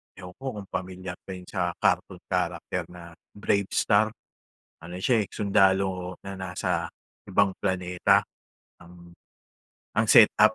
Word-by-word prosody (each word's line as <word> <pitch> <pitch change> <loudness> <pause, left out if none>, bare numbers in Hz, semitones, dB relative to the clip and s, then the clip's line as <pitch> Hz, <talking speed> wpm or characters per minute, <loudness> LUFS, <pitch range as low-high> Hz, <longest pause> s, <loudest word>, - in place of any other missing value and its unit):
ewan 90 -1 -10
ko 135 - -10 0.2
kung 95 - -13
pamilyar 90 -1 -5
ka - - -6
yung 90 - -10
sa 90 -3 -2
cartoon - - 0
character - - -1
na 85 -1 -11 0.2
Bravestar? 100 +1 +2 0.8
Ano 90 +2 -8
siya 120 -3 +3
eh, - - -18
sundalo 95 -2 +2
na 95 0 -6
nasa 90 -2 -2 0.4
ibang 100 -1 +3
planeta, 90 -2 +2 0.6
ang 85 0 -15 0.8
ang 110 - +4
setup, 110 -2 +7
95 Hz, 125 wpm, -26 LUFS, 90-100 Hz, 0.8 s, setup